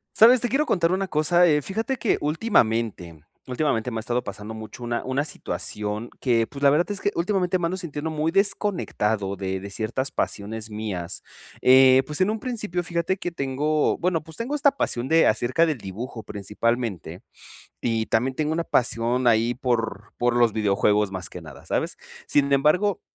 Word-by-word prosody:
¿Sabes? 235 +2 +7
Te 245 - 0
quiero 295 +5 +1
contar 170 - +2
una 190 +1 0
cosa, 175 +2 +3
eh 150 -3 +4
fíjate 225 - -2
que 235 - 0
últimamente 115 - 0 0.2
últimamente 125 -3 0
me 115 - -4
ha - - -1
estado 120 +2 -1
pasando 105 +2 -7
mucho 110 +2 -9
una 120 0 -2
una 135 +3 -1
situación 105 -6 -4
que, 115 -3 +2
pues, 140 - -10
la 140 - +7
verdad 155 +7 +2
es 200 - -5
que, - - +2
últimamente 180 +1 +1
me 175 - -1
ando 175 +2 -1
sintiendo 160 -3 -4
muy 155 +1 -1
desconectado 140 - 0
de 95 0 -3
de 100 +1 -8
ciertas 115 +6 -2
pasiones 110 +2 -3
mías. 100 -5 -4 0.4
Eh, 130 0 +7
pues 150 +4 -3
en 185 - +3
un 220 +1 -2
principio 210 -8 -3
fíjate 170 +2 -1
que 175 - -4
tengo, 150 +1 0
bueno, 170 -2 0
pues 160 0 -13
tengo 240 +5 -3
esta 285 -1 +4
pasión 120 +1 -1
de 160 +3 +4
acerca 130 +8 +2
del 155 -6 -2
dibujo 110 +5 -7
principalmente. 105 0 -3 0.6
Y 115 -2 0
también 125 +4 0
tengo 155 +1 -1
una 170 +1 -1
pasión 120 -2 +1
ahí 115 +1 +3
por 115 -5 -2
por 120 0 +2
los 120 -3 +3
videojuegos 105 -1 +2
más 95 -1 -5
que 90 - -8
nada, 80 -3 -12
¿sabes? - - -2 0.3
Sin 140 -1 +2
embargo, 180 +8 +2
130 Hz, 180 wpm, -24 LUFS, 110-170 Hz, 0.6 s, Sabes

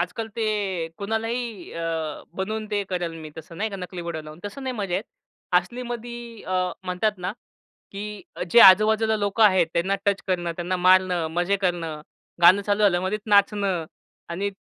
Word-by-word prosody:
आजकाल 185 +6 -2
ते 225 - 0 0.5
कुणालाही 225 -1 -3
अ, 165 -2 -3 0.2
बनवून 215 +2 -3
ते 205 -1 0
करेल 175 -2 -2
मी 155 - -8
तसं 160 +1 -10
नाही 215 +1 -2
का 195 - -5
नकली 180 -1 -6
बोडा 160 -2 -3
लावून, 155 +2 -11
तसं 205 +7 -6
नाही 260 - -2
मजा 195 -4 -2
येत. 195 +5 -1 0.5
असलीमध्ये 240 +2 -7
अ, 185 -1 -1
म्हणतात 185 +4 0
ना, 180 +2 -3 0.6
की 200 +1 -5 0.5
जे 235 - +7
आजूबाजूला 220 +3 +7
लोकं 205 +2 0
आहेत. 185 -5 +5
त्यांना 185 +4 +1
टच 200 -1 +2
करणं, 175 -2 -1
त्यांना 180 +1 -2
मारणं, 185 -2 +4
मजे 175 +4 +1
करणं. 165 -4 -1 0.4
गाणं 190 +4 +7
चालू 205 +1 0
झाल्यावर 185 -2 +3
मध्येच 210 +3 -1
नाचणं 200 -4 +3 0.4
आणि 195 +4 -2
190 Hz, 165 wpm, -24 LUFS, 175-215 Hz, 0.6 s, जे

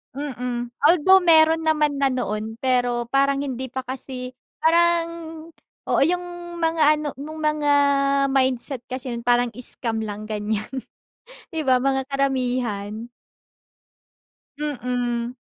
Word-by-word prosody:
Mm. 250 -4 -4 0.2
Although, 360 +4 +5
meron 320 -1 +5
naman 300 -2 +2
na 275 - +1
noon, 220 -3 -3
pero 245 -2 0
parang 275 +1 +2
hindi 260 -2 -4
pa 260 +1 -5
kasi 255 0 -6 0.3
parang 335 +1 +3 0.8
oo, - - +3
yung 350 0 -4
mga 325 -1 +1
ano, 300 0 -4
yung 310 +3 -7
mga 305 -1 +1 0.6
mindset 260 -1 0
kasi 255 0 -5
nun 235 -1 -5
parang 245 0 +3
scam 230 -2 +1
lang, 210 +1 -7
ganyan. 210 0 -2 0.8
Di 315 -4 -3
ba 255 -1 +4
mga 270 -1 0
karamihan. 245 -6 -2 1.5
Mm. 245 -4 -2
260 Hz, 115 wpm, -23 LUFS, 240-305 Hz, 1.5 s, Although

